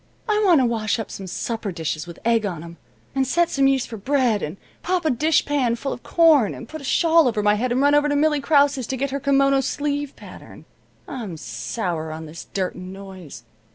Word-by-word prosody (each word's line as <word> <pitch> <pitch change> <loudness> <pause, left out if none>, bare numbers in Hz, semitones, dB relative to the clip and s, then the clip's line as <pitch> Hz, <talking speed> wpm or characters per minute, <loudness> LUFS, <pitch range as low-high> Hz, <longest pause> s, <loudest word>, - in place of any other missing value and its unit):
I 425 -1 +2
want 350 -7 +5
to - - +3
wash 225 -1 0
up 220 -4 -5
some 195 - -7
supper 220 +2 -3
dishes 160 -1 -4
with 170 - -9
egg 230 -1 +3
on 175 -6 -4
'em, 170 0 -11 0.4
and 265 -1 0
set 345 +5 +2
some 275 -1 +3
yeast 270 -2 +1
for 225 - -7
bread, 245 -2 +1
and 155 +6 -5 0.2
pop 360 -1 -1
a 310 - +3
dishpan 285 -3 +1
full 275 +3 -4
of - - -9
corn, 315 - +4
and 235 - -9
put 315 +3 -8
a - - -11
shawl 325 +2 +4
over 215 -3 0
my 210 0 +4
head 240 +4 -1
and 255 +2 +1
run 285 +1 +4
over 295 0 +3
to 290 - +1
Millie 300 0 +2
Krause's 280 -4 +3
to 265 - -3
get 275 +1 -2
her 280 - -2
kimono 275 0 +3
sleeve 290 0 -2
pattern. - - -13 0.4
I'm 215 -11 -6
sour 120 +8 -4
on 160 +1 -7
this 160 +2 -10
dirt 190 -2 -2
and 185 0 -9
noise. 190 - -10
245 Hz, 225 wpm, -22 LUFS, 190-285 Hz, 0.4 s, want